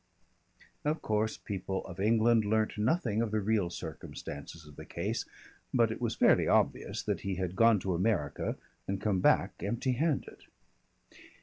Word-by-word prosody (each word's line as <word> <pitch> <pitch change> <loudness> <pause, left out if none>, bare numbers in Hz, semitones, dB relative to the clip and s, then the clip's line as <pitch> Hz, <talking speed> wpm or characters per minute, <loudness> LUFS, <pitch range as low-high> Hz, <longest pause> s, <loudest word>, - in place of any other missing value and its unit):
Of 150 +2 -1
course 110 0 0
people 95 -1 -4
of 95 -1 -9
England 110 +2 +4
learnt 110 +1 +1
nothing 110 -1 +1
of 115 - 0
the 110 0 0
real 105 -3 +1
circumstances 80 -1 -8
of 75 -1 -14
the - - -9
case, - - -3 0.5
but 115 -3 +3
it 110 - -6
was 115 -2 -1
fairly - - +4
obvious - - +1
that - - -2
he 95 -1 -2
had 90 -1 -3
gone 115 +1 +5
to 95 0 -1
America 90 -5 0 0.3
and 95 0 -1
come 100 -2 +1
back - - +2
empty 120 +5 -1
handed. 145 +3 -1
105 Hz, 160 wpm, -31 LUFS, 95-115 Hz, 0.5 s, gone